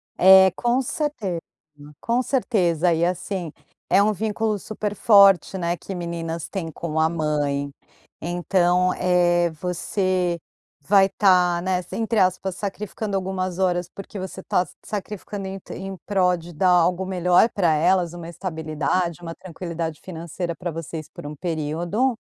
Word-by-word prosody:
É, 190 0 +8
com 240 +5 +1
certeza, 245 - -2 0.6
com 240 +2 +1
certeza 180 - +1
e 165 +1 0
assim, 180 -1 -3 0.4
é 190 +3 +5
um 210 +1 +3
vínculo 215 +1 -1
super 210 0 -4
forte, 195 -2 +5
né, 170 -1 -1
que 195 - -7
meninas 170 -2 -4
têm 165 -5 -4
com 160 0 -3
a 160 0 +3
mãe, 145 -3 -1 0.5
então, 175 +1 +2
eh, 175 -1 +3
você 180 +1 -1 0.4
vai 195 +5 +5
estar, 180 -3 +3
né, 185 0 0
entre 225 0 -1
aspas 185 0 +1
sacrificando 205 +1 -4
algumas 185 -1 -2
horas 175 -2 +1
porque 200 +1 -9
você 190 0 -6
está 180 - +1 0.2
sacrificando 205 -1 -5
em 195 0 -6
em 195 +1 -6
prol 185 -3 +3
de 170 +1 -11
dar 185 +4 +2
algo 180 +1 +3
melhor 180 +2 +3
para 175 -5 +2
elas, 175 +2 +2
uma 170 -1 -8
estabilidade, 165 0 -2
uma 165 -1 -7
tranquilidade 170 -3 -5
financeira 170 0 -5
para 175 -1 -4
vocês 160 -1 -6
por - - -11
um 150 - -7
período. 175 - -1
180 Hz, 145 wpm, -23 LUFS, 170-195 Hz, 0.6 s, É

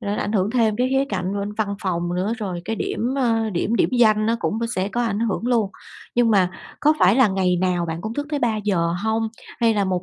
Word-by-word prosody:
nó 205 -2 -2
ảnh 210 - -2
hưởng 195 -1 +1
thêm 225 -3 +2
cái 250 +2 +1
khía 270 +1 +2
cạnh 190 -1 -2
bên 200 +1 -3
văn 210 -1 -2
phòng 175 -2 -1
nữa, 190 +5 -1
rồi 185 -5 -4
cái 225 - -3
điểm, 245 +5 -2
ơ, 225 -4 +1
điểm 205 +5 0
điểm - - +3
danh 215 -2 +4
nó 230 +1 +2
cũng 220 - -1 0.2
sẽ 190 +2 0
có 240 +3 -1
ảnh 220 -3 -1
hưởng 230 +1 -1
luôn, 230 -5 +1 0.4
nhưng 240 -1 +3
mà 190 -4 +3 0.3
có 305 +1 +4
phải 195 +1 +5
là 260 -5 +5
ngày 190 -2 +1
nào 175 -1 0
bạn 160 0 -4
cũng 220 +5 -5
thức 290 +2 -3
tới 295 - 0
3:00 210 -8 0
hông? 220 0 0 0.3
Hay 225 -1 +3
là 205 - +1
1 185 -1 -1
210 Hz, 245 wpm, -22 LUFS, 185-230 Hz, 0.4 s, phải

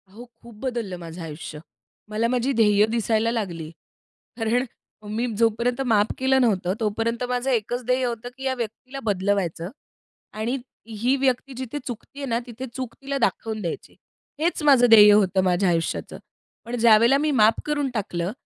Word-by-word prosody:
हो, 225 +6 -12 0.2
खूप 235 -2 -14
बदललं 230 -8 -3
माझं 170 +1 -8
आयुष्य. 155 -1 -7 0.5
मला 215 +2 0
माझी 250 +2 0
ध्येय 210 -3 +4
दिसायला 225 0 +1
लागली. 175 -9 -4 0.7
कारण 240 +2 +1 0.5
मी 235 +2 0
जोपर्यंत 235 +3 +1
माफ 215 -3 +2
केलं 265 0 +3
नव्हतं, 190 -6 +1
तोपर्यंत 225 +2 -1
माझं 250 +1 -1
एकच 245 +1 -1
ध्येय 250 +1 +1
होतं, 240 0 -4
की 265 - -9
या 265 -1 0
व्यक्तीला 245 +3 -6
बदलवायचं 190 -4 -1 0.7
आणि 235 +5 -1 0.3
ही 230 +4 0
व्यक्ती 265 0 0
जिथे 260 +2 -5
चुकते 245 +3 -8
आहे 280 - -3
ना, 230 0 +1
तिथे 245 +2 -7
चूक 255 -3 -5
तिला 275 0 -3
दाखवून 225 -3 -1
द्यायची. 170 -4 -6 0.4
हेच 330 0 0
माझं 270 -5 +6
ध्येय 210 -2 +9
होतं 195 -2 +3
माझ्या 185 +1 +2
आयुष्याचं. 165 -1 -2 0.5
पण 235 +1 -4
ज्यावेळेला 230 +3 +6
मी 300 +1 0
माफ 220 -4 +4
करून 290 -2 -1
टाकलं, 185 -5 -2
230 Hz, 160 wpm, -24 LUFS, 205-250 Hz, 0.7 s, ध्येय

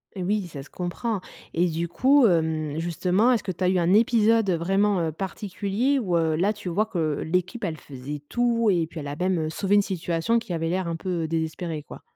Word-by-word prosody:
Et 185 - -3
oui, 200 0 0
ça 145 -5 -8
se - - -17
comprend. 185 +4 -3 0.3
Et 175 +2 +2
du 170 +1 -2
coup, 265 - +4
hem, 160 -5 +1
justement, 180 +7 +2
est-ce 240 - +1
que 195 - -2
tu 185 +1 -5
as 180 - +4
eu 185 - +2
un 175 +1 +3
épisode 225 -1 +4
heu, 180 - +3
vraiment, 195 +4 +2
heu, 160 -1 -1
particulier 200 - -1
où, 180 -8 0
heu, 160 -1 +1
là 190 +6 +2
tu 205 -3 -9
vois 205 +6 +1
que, 205 - -5 0.2
heu, - - -4
l'équipe, 185 +8 -1
elle 165 -5 -2
faisait 140 +1 -8
tout? 235 0 +2
Et 170 -3 +1
puis, 165 0 -8
elle 145 - -6
a 145 - -4
même 180 +3 0
heu, 155 -1 -1
sauvé 195 +4 +1
une 205 - +6
situation 180 +4 0
qui 230 -4 -9
avait 165 0 -1
l'air 185 +1 -1
un 165 - -2
peu 170 -1 -2
désespérée, 160 0 -3
quoi? - - -11
180 Hz, 235 wpm, -25 LUFS, 165-210 Hz, 0.3 s, une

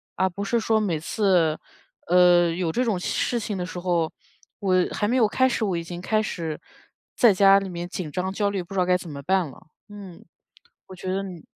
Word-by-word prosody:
而 190 - +2
不 200 +3 -6
是 235 +3 0
说 220 0 +1
每 180 -8 -1
次， 175 -3 +1 0.5
呃， 175 -1 +5
有 170 -1 -2
这 250 - 0
种 210 -7 0
事 240 +6 -1
情 210 -2 -4
的 180 - -3
时 180 0 -7
候， 175 -3 0 0.5
我 185 -2 +2
还 205 - -1
没 245 - 0
有 230 -4 +4
开 260 +5 +2
始， 235 - -1
我 190 -5 0
已 170 - -4
经 175 +1 -7
开 215 +3 +1
始 165 -6 -4 0.6
在 235 -4 +6
家 195 +1 +6
里 195 -1 -6
面 175 0 -5
紧 175 -4 -6
张 185 +2 -3
焦 205 0 0
虑， 195 -3 -3
不 175 - -12
知 195 - -1
道 180 - +3
该 180 0 +4
怎 180 - -10
么 140 -2 -7
办 185 +2 +1
了， 135 - -15 0.2
嗯， 200 -4 -11 0.6
我 190 - -11
觉 185 +1 -4
得 195 +1 -1
你 180 -5 -9
185 Hz, 245 characters per minute, -24 LUFS, 175-200 Hz, 0.6 s, 在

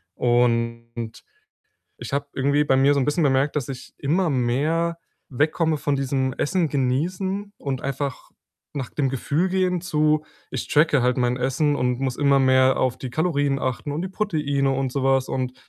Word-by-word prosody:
und 115 -1 0 0.7
ich - - -8
habe 140 +1 -1
irgendwie 140 +2 +2
bei 135 - +3
mir 135 +2 +4
so 140 - +1
'n - - +1
bisschen 150 +4 +1
bemerkt, 140 +1 +2
dass 140 -4 -2
ich 135 -2 -8
immer 165 +4 +1
mehr 150 +7 0 0.3
wegkomme 155 +4 +1
von 145 -1 0
diesem: 135 -1 -1
„Essen 170 +3 0
genießen 180 +10 -1
und 135 -2 -4
einfach 140 -1 -4 0.5
nach 135 -3 -4
dem 140 -3 0
Gefühl 140 +7 0
gehen“, 185 -1 +1
zu: 155 -2 +1 0.3
„Ich - - -4
tracke 150 -2 +3
halt 125 0 +2
mein 125 -1 +1
Essen 135 +4 +1
und 125 -1 0
muss 130 -2 -1
immer 140 -1 +3
mehr 130 0 +4
auf 130 -2 0
die 130 - -6
Kalorien 145 -2 0
achten 130 +3 -3
und 155 +4 -3
die 185 - -3
Proteine 150 -9 0
und 135 -1 -1
so 140 - -2
was.“ 135 -1 +2
Und 130 -1 -2
140 Hz, 175 wpm, -23 LUFS, 130-155 Hz, 0.7 s, mir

